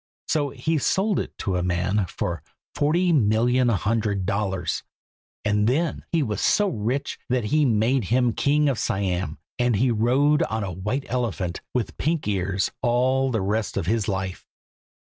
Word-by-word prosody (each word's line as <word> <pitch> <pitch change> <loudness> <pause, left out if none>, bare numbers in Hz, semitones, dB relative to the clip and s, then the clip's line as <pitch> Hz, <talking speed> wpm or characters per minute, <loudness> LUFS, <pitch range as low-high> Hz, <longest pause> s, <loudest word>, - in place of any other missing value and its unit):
So 145 -2 +1
he 150 +4 -1
sold 195 - +1
it - - -6
to 95 -2 -1
a - - 0
man 90 +3 0
for 85 -2 -3 0.3
forty 170 +4 +2
million 120 0 +3
hundred 105 -2 0
dollars; 95 -3 -1 0.6
and 105 0 +2
then 155 +5 0
he 165 -3 +2
was 105 -5 -2
so 205 -1 +3
rich 130 - -2
that 125 -4 0
they 150 -1 +4
made 115 +1 +2
him 120 +2 +2
King 150 +1 +2
of 135 -5 0
Siam, 90 -4 -1 0.2
and 120 -2 +2
he 125 +5 +2
rode 130 +7 +3
on 110 -1 -1
a 95 - -3
white 105 +10 -3
elephant 110 -8 -2
with 120 -5 -2
pink 160 -3 0
ears 95 -1 0
all 130 +2 +2
the 115 -5 0
rest 105 +3 -1
of 95 - -1
his 110 +3 0
life." 95 -2 -3
115 Hz, 165 wpm, -24 LUFS, 100-135 Hz, 0.6 s, they